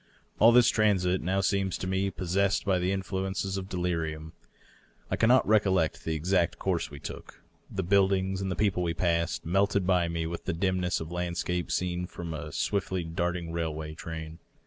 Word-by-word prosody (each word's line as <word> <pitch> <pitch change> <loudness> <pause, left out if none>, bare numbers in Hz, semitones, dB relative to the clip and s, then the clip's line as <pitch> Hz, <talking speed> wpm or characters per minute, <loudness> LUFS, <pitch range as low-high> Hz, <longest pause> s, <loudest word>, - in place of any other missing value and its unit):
All 115 +2 +8
this 120 0 +6
transit 95 -4 +2
now 95 +3 0
seems 95 -1 0
to - - -5
me 95 +1 0
possessed 95 +2 0
by 95 -2 +2
the 90 +1 0
influences 95 0 -2
of 95 0 -5
de 90 - -4
lirium. 80 -3 -2 0.8
I - - +2
cannot 120 +3 +4
recollect 95 -6 +2
the 80 - -1
exact 85 +2 +1
course 85 -4 -1
we 75 - -9
took. 70 - -9 0.3
The 95 - -3
buildings 95 0 +2
and 95 - -2
the - - -1
people 100 -2 +1
we 85 -1 -1
passed 85 -2 0
melted 100 +2 +2
by 90 -2 +3
me 85 -1 -2
with 85 +1 -5
the 95 - -1
dimness 90 0 0
of 80 +1 -6
landscape 90 0 -2
seen 90 0 -1
from 85 -2 -6
a 80 - -6
swiftly 95 -2 -1
darting 85 +1 -2
railway 80 -2 -3
train. 80 0 -7
90 Hz, 180 wpm, -28 LUFS, 85-95 Hz, 0.8 s, All